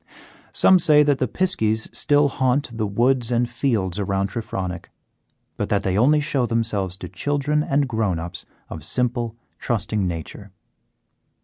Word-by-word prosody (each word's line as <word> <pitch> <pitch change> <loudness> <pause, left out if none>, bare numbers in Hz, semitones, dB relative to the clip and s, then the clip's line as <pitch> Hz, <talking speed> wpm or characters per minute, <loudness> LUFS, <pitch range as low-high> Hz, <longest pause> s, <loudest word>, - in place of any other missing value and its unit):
Some 190 -1 +5
say 150 -2 +5
that 145 -2 +1
the 130 - +1
piskies 110 - 0
still 145 0 +3
haunt 130 -2 0
the 110 -2 -1
woods 120 +3 +1
and 120 0 +2
fields 115 -7 -1
around 100 0 -1
Trefronick, 95 -6 -5 0.7
but - - -2
that 100 -1 +1
they 95 -1 0
only 140 +8 +4
show 140 -4 0
themselves 105 -6 -1
to - - -7
children 145 +1 -1
and 140 -1 +1
grown 110 -7 -1
ups 85 +3 -6 0.2
of - - -8
simple, 120 -2 -1 0.2
trusting 105 -3 -1
nature. 85 +4 -6
115 Hz, 145 wpm, -22 LUFS, 100-140 Hz, 0.7 s, Some